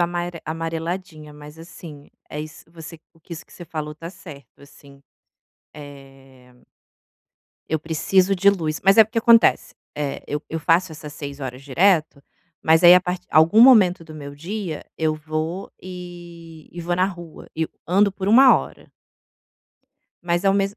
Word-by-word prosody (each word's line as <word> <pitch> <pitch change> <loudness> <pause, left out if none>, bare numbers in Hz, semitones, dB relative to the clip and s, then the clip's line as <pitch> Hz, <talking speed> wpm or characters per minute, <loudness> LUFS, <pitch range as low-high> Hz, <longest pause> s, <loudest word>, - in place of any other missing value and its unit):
amare 175 0 -3
amareladinha, 165 0 -5
mas 150 +1 -13
assim, 165 -3 -13 0.2
é 150 - -5
isso 155 0 -10
você 165 0 -11
o 165 - -27
que 170 - -10
isso 160 - -11
que - - -23
você 175 - -12
falou 150 -2 -6
está 165 +2 -10
certo, 145 -8 -14
assim. 140 -1 -18 0.7
É 135 -3 -15 1.1
eu 160 - -1
preciso 180 +5 +1
de 195 +2 +4
luz, 160 -6 -3
mas 195 +3 +5
é 220 - +9
porque 220 +2 -4
acontece, 230 0 +3 0.2
eh, 145 -2 -4
eu 150 +1 -4
eu 160 - -4
faço 170 +2 +1
essas 150 -1 -10
6 145 -1 -8
horas 130 -1 -7
direto, 155 +1 +1 0.4
mas 160 +1 +3
aí 175 +1 +10
a 180 - +5
part 180 0 -5
algum 160 +8 +5
momento 205 -9 +6
do 160 -1 -12
meu 140 -2 -9
dia, 170 +1 -6
eu 155 -1 0
vou 155 +4 -5
e 175 -3 -11
e 175 - -8
vou 175 +1 -2
na 185 - +2
rua 175 -4 -10
e 160 - -1
eu 160 - -2 0.2
ando 200 +3 +3
por 195 0 -4
1 255 +5 +7
hora. - - -8 1.3
Mas 175 +1 -1
ao 195 - +4
mesmo 200 +1 -1
165 Hz, 170 wpm, -21 LUFS, 150-180 Hz, 1.3 s, aí